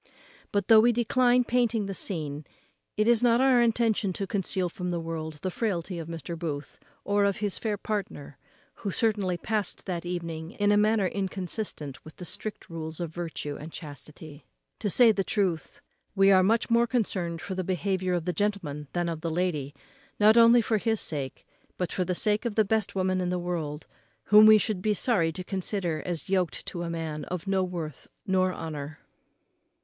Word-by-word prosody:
But, 200 -2 0
though 225 -1 +8
we 240 +2 +5
decline 245 +1 +3
painting 235 -3 +1
the 195 - -4
scene, 155 -6 -3 0.5
it 215 +1 +2
is 235 -2 +5
not 240 -1 +4
our 260 -2 +5
intention 225 -4 +2
to 195 - -3
conceal 190 -1 -1
from 180 +1 -5
the 175 -1 -1
world 165 -1 -4
the 185 - -1
frailty 180 -4 -2
of 160 - -6
Mr. 165 0 -5
Booth, 150 -3 -5 0.2
or 205 0 +2
of 200 -1 +1
his 205 -2 -2
fair 215 -2 -1
partner, 195 - -5 0.4
who 205 - -4
certainly 200 -3 0
past 210 +2 -2
that 175 -3 -3
evening 170 -1 -5
in 205 0 +2
a - - +5
manner 210 -1 +3
inconsistent 185 - -4
with 155 - -13
the 180 - -8
strict 215 +5 -6
rules 160 -1 -6
of 170 -2 -4
virtue 160 -4 -5
and 155 +3 -9
chastity. 150 -1 -10 0.4
To 210 - -1
say 235 +3 +6
the 200 -2 0
truth, 185 -6 -2 0.3
we 195 0 +5
are 190 -1 +6
much 225 +5 +2
more 235 +1 +4
concerned 185 -8 -1
for 190 - -5
the 185 0 -2
behaviour 185 0 -1
of 170 -2 -2
the 180 - -1
gentleman 160 -7 -2
than 175 -1 0
of 165 -2 -4
the 165 - -2
lady, 160 -5 -1 0.4
not 215 +1 +6
only 235 +1 +7
for 220 0 +1
his 225 0 0
sake, 140 -4 -4 0.3
but 180 - -2
for 185 - 0
the 180 0 -2
sake 210 +3 +1
of 235 -4 -3
the 220 - +4
best 215 -1 0
woman 185 -1 +1
in 180 - -1
the 180 - 0
world, 165 -4 -4 0.4
whom 210 +1 +8
we 215 0 +9
should 210 -3 -1
be 210 +1 +1
sorry 185 -8 +2
to 180 +3 -6
consider 185 -4 -2
as 170 -5 -4
yoked 185 -3 0
to 170 - -5
a 170 - -3
man 160 -2 -4
of 180 0 -5
no 195 -1 +1
worth 170 -5 -5 0.2
nor 185 -2 +2
honour. 155 -3 -6
185 Hz, 195 wpm, -27 LUFS, 165-210 Hz, 0.5 s, we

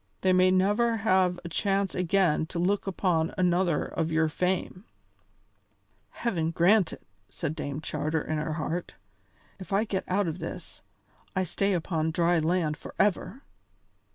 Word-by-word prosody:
They 185 -1 +3
may 185 0 +5
never 205 +5 +2
have 185 -4 +2
a - - -4
chance 195 +2 0
again 180 -3 +1
to 170 - -7
look 195 +4 0
upon 175 -4 0
another 180 -1 +2
of 165 -1 -2
your 160 0 +2
fame." 180 +3 -2 1.3
"Heaven 170 -9 -2
grant 175 +3 +3
it!" - - -10 0.3
said 155 -3 -4
Dame 145 0 -4
Charter 155 0 -2
in 155 -1 -2
her 155 +1 -2
heart. 165 +2 -4 0.6
"If 185 - -10
I 200 +2 +3
get 195 -4 -2
out 195 +1 +1
of 165 +2 -4
this, - - -7 0.5
I 185 - +2
stay 195 +3 0
upon 165 -2 -1
dry 170 +1 +2
land 160 -1 0
forever." 210 +9 -1
180 Hz, 150 wpm, -28 LUFS, 160-195 Hz, 1.3 s, may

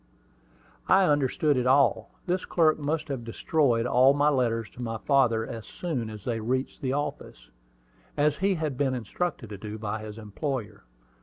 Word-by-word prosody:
I 190 +1 +5
understood 145 0 +2
it 125 0 +1
all. 130 -4 +3 0.2
This 185 +1 -1
clerk 155 -3 +2
must 150 +2 -2
have 135 -4 -3
destroyed 120 0 +1
all 130 +3 +5
my 145 +1 +3
letters 115 -5 0
to 120 - -10
my 115 -2 -3
father 115 -4 +2
as 115 -1 -7
soon 135 -11 -4
as 105 -2 -9
they 115 -2 -1
reached 130 +4 -2
the 130 - -1
office, 100 - -5 0.7
as 150 0 +2
he 195 0 +1
had 155 -6 -3
been 135 -2 +1
instructed 125 - -3
to 100 - -7
do 105 +1 -6
by 110 0 -3
his 110 0 -8
employer. 110 -1 -5
130 Hz, 170 wpm, -27 LUFS, 115-145 Hz, 0.7 s, I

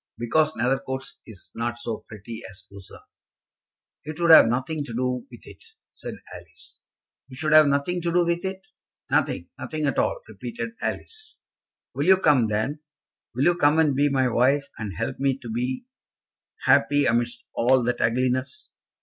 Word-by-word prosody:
"Because 155 +7 +1
Nethercoats 130 +2 -2
is 100 -7 -13
not 120 +1 -3
so 115 -2 -5
pretty 110 +1 -9
as 95 - -13
Lucerne." 100 -1 -12 1.1
"It 155 +2 -7
would 170 -1 +4
have 160 - +9
nothing 135 +6 -1
to 115 - -7
do 125 - -2
with - - -13
it," - - -14 0.3
said - - -8 0.2
Alice. - - -14 0.5
"It 130 - -11
should 155 +2 0
have 155 -1 +8
nothing 140 +6 0
to 170 0 -1
do 175 0 +3
with 170 0 -1
it." 190 0 -6 0.4
"Nothing; 85 - 0
nothing 155 -1 -3
at 140 - 0
all," - - 0
repeated 120 - -6
Alice. 435 -1 -5 0.5
"Will 145 - -2
you 190 0 +7
come, 145 -10 +3
then? 110 +8 -2 0.6
Will 130 - 0
you 175 - +5
come 150 -2 +3
and 155 -4 +3
be 145 +2 +3
my 130 -2 +2
wife, 130 +4 +2
and 100 -6 -5
help - - -3
me 135 -1 +1
to 120 -4 -8
be 125 - -3 0.8
happy 145 -1 +4
amidst 120 0 0
all 125 +2 +3
that 120 0 -1
ugliness? 130 - -1
130 Hz, 165 wpm, -24 LUFS, 120-155 Hz, 1.1 s, have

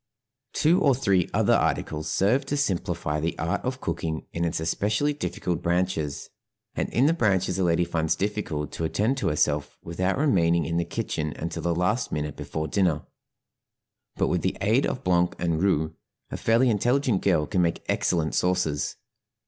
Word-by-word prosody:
Two 170 +5 +3
or 140 -6 +4
three 100 -8 +1
other - - +3
articles 75 0 0
serve 105 - +2
to 145 - -1
simplify 85 - -1
the 80 +2 -2
art 85 +1 -1
of 125 0 -3
cooking 80 -9 -3
in 85 - -1
its 85 - -1
especially 105 - 0
difficult 90 - -3
branches, 85 -4 -1 0.4
and - - -2
in 125 - +2
the 155 - +4
branches 95 - +1
a - - +2
lady 85 0 +2
finds 80 -2 0
difficult 95 -7 -3
to - - -5
attend 105 +10 +1
to 100 - -1
herself 75 -2 0
without 90 +3 -1
remaining 85 - +2
in 85 +2 -1
the 85 - 0
kitchen 75 -1 -3
until 85 - -4
the 85 -1 0
last 105 +8 0
minute 75 -2 -3
before 80 0 -4
dinner; 85 -4 +1 1.1
but - - +1
with - - 0
the - - -1
aid - - +2
of - - -4
blanc 90 -1 +2
and 85 -2 -1
roux 80 -5 +1 0.4
a - - -3
fairly 120 +2 +3
intelligent 120 0 +1
girl 85 -6 +2
can 95 +1 0
make 85 -1 0
excellent 80 -3 0
sauces. 90 -5 0
90 Hz, 175 wpm, -26 LUFS, 80-105 Hz, 1.1 s, or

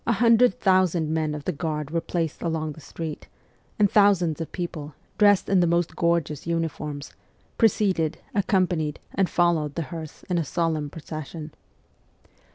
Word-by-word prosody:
A 235 - +4
hundred 230 0 +4
thousand 185 -4 +2
men 155 -1 0
of 150 - -6
the 185 - -1
Guard 150 -2 -3
were 165 0 0
placed 165 -3 -3
along 160 -2 -2
the 155 - -11
streets, 155 +1 -7 0.5
and 210 - +5
thousands 185 -6 +3
of 165 - -5
people, 155 -5 -5 0.2
dressed 205 -2 +5
in 195 -1 +3
the 175 - +3
most 170 -1 +1
gorgeous 170 -3 0
uniforms, 155 -3 -3 0.5
preceded, 185 -8 +2 0.2
accompanied, 180 -6 +1
and 190 -2 +1
followed 165 -4 +1
the 165 - -1
hearse 160 -2 -8
in 180 -2 -1
a - - +1
solemn 155 -1 -1
procession. 155 0 -7
165 Hz, 155 wpm, -25 LUFS, 155-185 Hz, 0.5 s, and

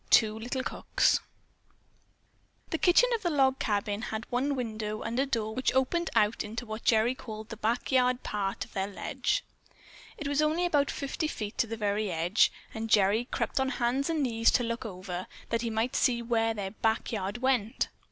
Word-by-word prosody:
TWO 220 -1 +5
LITTLE 250 +3 -3
COOKS - - +2 1.5
The 320 - 0
kitchen 365 +8 +5
of 460 - 0
the 350 - 0
log 270 -3 +3
cabin 205 -1 -1
had 220 -1 -4
one 270 +4 +1
window 215 -3 -3
and 235 +3 -2
a 275 - +2
door 220 -4 -1
which 255 +2 0
opened 325 +6 +1
out 210 +1 +3
into 225 +3 -5
what 220 0 -6
Gerry 225 +2 +4
called 220 -4 -8
the 225 - -7
"back 230 +5 -1
yard 250 -1 +3
part 195 -2 -2
of - - -21
their 190 0 -1
ledge." 205 - -1 0.7
It 305 - -4
was 285 +1 +1
only 315 +4 +2
about 290 -5 +2
fifty 285 +3 -2
feet 210 -8 -5
to 235 - +3
the 225 +1 -4
very 205 -1 0
edge, 170 +6 +3 0.2
and 225 0 -4
Gerry 210 +3 +4
crept 265 - -2
on 265 0 +1
hands 255 +3 0
and 320 -3 +1
knees 230 -3 +3
to 245 - +3
look 230 -1 -3
over, 185 -2 -6 0.2
that 230 0 0
he 235 - -1
might 225 +4 -1
see 235 -2 +2
where 225 -1 +1
their 195 -2 -4
"back 220 +1 0
yard 205 -1 -2
went." 245 -5 +1
230 Hz, 190 wpm, -29 LUFS, 215-265 Hz, 1.5 s, TWO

